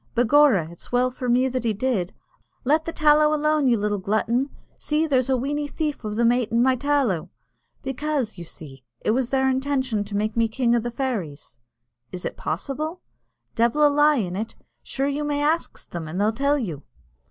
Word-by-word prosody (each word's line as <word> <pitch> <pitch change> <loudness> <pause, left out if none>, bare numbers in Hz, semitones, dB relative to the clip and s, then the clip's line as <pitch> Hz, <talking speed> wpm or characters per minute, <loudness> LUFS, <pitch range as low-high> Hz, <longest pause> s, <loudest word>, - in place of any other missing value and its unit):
Begorra, 245 - +4
it's 170 - -13
well 250 +1 +2
for 250 0 -4
me 250 +2 +3
that 255 -2 -2
he 225 -2 +1
did 205 -5 -1 0.5
(let 310 +4 +2
the 330 - -3
tallow 300 0 +4
alone, 305 -1 +2
you 240 -2 +4
little 205 0 -1
glutton 225 +7 0 0.3
see, 305 +1 0
there's 265 -4 +1
a 260 - +3
weeny 290 +3 -2
thief 300 -2 -3
o' 215 - -3
them 230 +2 +3
aitin' 235 -1 +1
my 260 0 +3
tallow) 265 - 0 0.5
becaise, 270 -3 -2
you 175 - -8
see, 140 -6 -11 0.2
it - - +1
was 250 +1 0
their 265 0 +2
intention 260 -4 0
to 205 0 -4
make 215 +1 -1
me 230 -1 +3
king 240 +1 +1
o' - - +3
the 240 +1 -3
fairies." 200 - -4 0.5
"Is 180 -1 -6
it - - -3
possible?" 305 - -4 0.5
"Devil 240 +6 +3
a - - +6
lie 295 +1 +4
in 185 -8 -2
it. 220 +3 -4 0.3
Sure 270 - -3
you 285 +1 -1
may 295 -1 -1
ax 320 +3 -1
them, 170 -2 -6
an' 165 +4 -5
they'll 210 +3 +2
tell 280 +5 +1
you." 175 - -4
250 Hz, 195 wpm, -24 LUFS, 215-285 Hz, 0.5 s, a